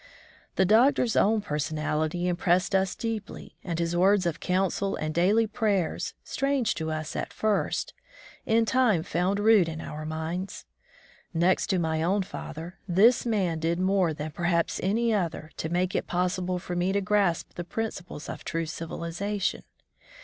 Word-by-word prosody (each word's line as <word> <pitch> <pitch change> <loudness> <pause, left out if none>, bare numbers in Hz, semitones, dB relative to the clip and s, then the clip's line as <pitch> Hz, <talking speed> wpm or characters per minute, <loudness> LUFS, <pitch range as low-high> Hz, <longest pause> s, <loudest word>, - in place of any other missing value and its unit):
The 190 - +3
Doctor's 230 +3 +4
own 215 +1 +3
personality 155 +1 -1
impressed 180 +2 +1
us 190 -1 +2
deeply, 225 -3 -5
and 170 -3 -3
his 170 0 -1
words 190 +2 +4
of 165 -1 -1
coimsel 195 +1 0
and 155 0 -2
daily 200 +7 +3
prayers, 205 -5 -1
strange 275 -5 0
to 160 -1 -4
us 155 0 -4
at - - -3
first, 215 -2 -1 0.5
in 225 +1 +3
time 225 -9 +3
found 185 +5 0
root 210 -5 +5
in 160 0 -5
our 155 -1 -6
minds. 160 +4 -4 0.7
Next 175 +3 +2
to 190 - +1
my 160 -2 0
own 190 +4 +1
father, 165 0 -8
this 215 +8 +4
man 185 -8 0
did 165 +1 0
more 185 -2 +2
than 155 0 -5
perhaps 170 +1 0
any 225 +4 +1
other 165 -5 -2
to 160 - -3
make 180 +2 0
it - - -1
possible 180 0 -1
for 180 0 -5
me 175 +2 +1
to 200 - +2
grasp 200 -4 +1
the 175 - -5
principles 180 -5 -5
of - - -7
true 165 0 -2
civilization. 170 +5 -3
180 Hz, 155 wpm, -27 LUFS, 165-205 Hz, 0.7 s, root